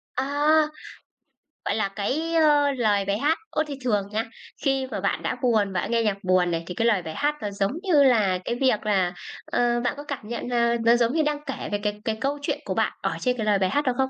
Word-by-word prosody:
À, 285 +3 0 1.2
gọi - - 0
là, 215 -2 +1
cái 305 +11 -1 0.4
lời 205 -4 +2
bài 200 +1 0
hát. 310 +3 +2
Ô, 310 - 0
thì 280 -2 -6
thường 210 -5 0
nha, 220 +2 -1 0.4
khi 270 -1 +1
mà - - -3
bạn - - -1
đã - - -1
buồn, 215 -6 +2
bạn 185 - -2
nghe 230 -1 +2
nhạc 210 -3 0
buồn 185 -1 +2
này, 165 0 -2
thì 180 - -6
cái 230 - 0
lời 210 -5 +3
bài 160 -2 -6
hát 295 +1 0
nó 205 - -3
giống 200 +1 -1
như 325 -7 +4
là 215 -8 +3
cái 240 - -1
việc 245 -4 +1
là 190 -4 +1 0.3
ờ, 240 0 +1
bạn 245 - 0
có 290 - -7
cảm 280 -7 -6
nhận 235 +1 -4
là 235 -1 +2
nó 235 +1 +6
giống 240 0 +2
như 315 -1 +2
đang 295 -1 -1
kể 270 - -5
về 205 - +1
cái 210 0 -2
cái 220 - 0
câu 285 +3 -1
chuyện - - -2
của - - -2
bạn - - 0
ở - - -2
trên 250 -1 0
cái 220 - -2
lời 205 -2 +3
bài 185 - +1
hát 290 - +1
đó 255 - +2
không? 265 0 +1
235 Hz, 250 wpm, -25 LUFS, 205-270 Hz, 1.2 s, nó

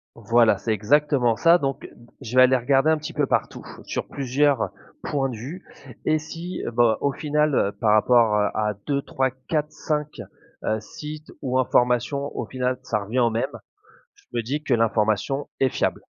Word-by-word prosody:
Voilà, 115 +1 +3
c'est 110 - -1
exactement 125 +2 +2
ça, 170 +8 +5
donc 135 -4 -3
heu, - - -9 0.3
je 125 -2 -6
vais 130 - +8
aller 130 +1 +5
regarder 135 +4 +3
un 160 - +3
petit 155 +3 -7
peu 150 -1 +1
partout, - - -2 0.2
sur - - -4
plusieurs 140 -1 +1 0.3
points 140 -2 -1
de 125 - -5
vue 140 +12 -8 0.4
et 155 0 +2
si, 165 +3 -6
bah, 115 -1 +3
au 140 - +1
final, 150 0 0
heu, 100 - +2
par 105 0 +1
rapport, 115 0 +4
heu, 105 0 +3
à 105 -1 -1
2-3-4-5, 145 +2 -2 0.4
heu, 110 0 0
sites 150 +5 -9
ou 130 -1 -1
informations 125 +2 +1
au 120 - -2
final 125 +1 -2
ça 105 - -1
revient 115 +6 -2
au 120 -2 +3
même, 115 - -2 0.6
je - - -25
me 120 - 0
dis 140 +7 -3
que 135 - +1
l'information 110 +4 0
est 130 - +3
fiable. - - -1
130 Hz, 175 wpm, -24 LUFS, 115-150 Hz, 0.6 s, vais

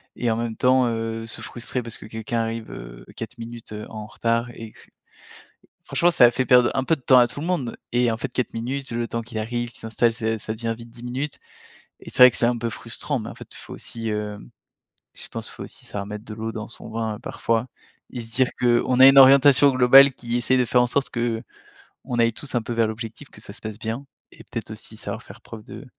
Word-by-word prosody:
et 120 -2 0
en 110 - 0
même 115 -1 -3
temps, 130 -1 +4
heu, 115 0 -3
se 115 - -8
frustrer 125 +1 -5
parce 115 - -5
que 105 - -10
quelqu'un 110 +1 -3
arrive 115 0 -3
heu, - - -10
4 115 +2 -7
minutes, 115 -1 -9
heu, 105 0 -6
en 105 -1 -7
retard 115 +2 -1
et 115 -1 -9
que - - -18
c - - -17 0.9
franchement, 175 +1 +2
ça 125 - +7
a 120 - +6
fait 130 +1 -1
perdre 125 -1 +6
un 135 -1 0
peu 165 - +3
de - - -18
temps 130 0 +6
à 120 - +6
tout 145 - -6
le - - -4
monde 140 -10 -1 0.2
et 120 0 +2
en - - -1
fait, 120 - -4
4 125 - -2
minutes, 130 +3 -4
le 120 0 -2
temps 115 - -2
qu'il 115 -1 -6
arrive, 120 +2 -3
qu'il - - -11
s'installe, 115 +1 +1
ça 110 -1 -2
ça 110 +1 -4
devient 115 0 -3
vite 115 0 -12
10 115 +1 -13
minutes 130 +4 -4 0.6
et - - -9
c'est 125 - +7
vrai 125 - +9
que - - -3
c'est 120 - +3
un 120 -1 +1
peu 115 0 -2
frustrant, 120 +5 -4
mais 110 - -7
en - - -9
fait, - - -10
il - - -11
faut - - -10
aussi, 115 -1 -5
hem, 105 - -4 0.6
je - - -9
pense, - - -5
il - - -10
faut - - -9
aussi - - -9
savoir 100 -1 -5
mettre 105 +2 -7
de 105 - -6
l'eau 115 +1 -4
dans 110 -1 -6
son - - -10
vin, 110 -1 -3
parfois 115 +2 -1 0.4
et 120 - -5
se 115 - -8
dire 125 +3 +2
qu'on 125 +1 +2
a 130 - +11
une 135 - +5
orientation 135 +1 +8
globale 135 +2 +7
qui 120 0 -4
essaye 130 +2 +2
de 125 - +2
faire 125 +1 +4
en - - +2
sorte 135 +3 0
qu'on 115 -1 -4 0.6
aille 115 0 +4
tous, 135 0 -6
un 120 - +2
peu, 115 - -7
vers 115 -1 +2
l'objectif, 115 +5 -7
que - - -15
ça - - -10
se 105 - -11
passe 110 -1 -7
bien 115 +5 -4 0.3
et - - -15
peut-être - - -6
aussi - - -9
savoir - - -6
faire - - -14
preuve 110 -2 -10
de 140 - -10
115 Hz, 255 wpm, -23 LUFS, 110-125 Hz, 0.9 s, a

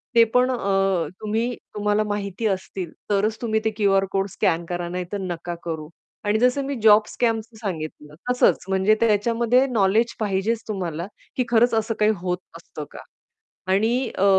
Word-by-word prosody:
ते 230 - +8
पण 250 +1 +4
अ, 195 -7 +1
तुम्ही 225 +3 -1 0.2
तुम्हाला 210 0 +1
माहिती 205 +1 -2
असतील, 190 -2 -3 0.2
तरच 210 +2 +1
तुम्ही 220 -2 +1
ते - - +4
क्यूआर 195 -2 +3
कोड 195 0 0
स्कॅन 170 -2 0
करा 175 -1 -3
नाहीतर 180 +2 -4
नका 175 -1 -4
करू. 160 -2 -4 0.4
आणि 210 +1 +2
जसं 250 +3 +3
मी 280 0 -2
जॉब 215 0 +7
स्कॅमच 225 -2 0 0.2
सांगितलं, 155 -6 -5
तसंच 250 0 +3
म्हणजे 190 +3 +3
त्याच्यामध्ये 230 +3 +3
नॉलेज 225 0 +2
पाहिजेच 215 +2 0
तुम्हाला, 175 -5 -3 0.3
की 255 - +1
खरंच 235 +1 +4
असं 225 0 0
काही 210 0 +4
होत 180 -1 -1 0.2
असतं - - -9
का? - - -10 0.7
आणि 230 +6 +2
अ, 190 - +3
210 Hz, 160 wpm, -23 LUFS, 190-230 Hz, 0.7 s, ते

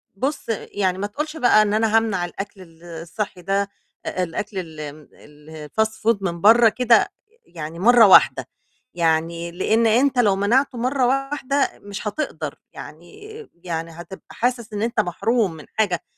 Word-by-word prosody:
بُص 275 +9 -3
يعني 200 -4 -2
ما 200 +2 -3
تقولش 300 +9 -5
بقى 245 -6 +5
إن 210 -1 +1
أنا 220 0 +3
هامنع 210 -6 0
الأكل 195 +2 -8
ال 165 -2 -17
الصحي 175 +3 -6
ده 195 +2 -1 0.4
الأكل 185 +3 -4
ال 155 -4 -7
م 155 - -17
الfast 150 +8 -5
food 220 0 0
من 170 -3 -3
برّه 225 +2 +7
كده 235 +1 +3 0.4
يعني 160 - -8
مرّة 235 +1 +6
واحدة. 190 - +5 0.5
يعني، 170 0 0
لأن 220 +6 +1
أنت 250 +4 +2
لو 205 -5 +4
منعتُه 240 +7 +1
مرّة 255 +2 0
واحدة 275 +1 0
مش 205 +1 -6
هتقدر 305 +9 -4 0.2
يعني 425 +1 -12 0.3
يعني 165 -1 -4
هتبقى 170 +3 -11
حاسسّ 235 -3 -2
إن 205 - -3
أنت 230 0 -1
محروم 210 +2 0
من 155 -2 -12
حاجة 195 -6 0
205 Hz, 150 wpm, -22 LUFS, 170-235 Hz, 0.5 s, برّه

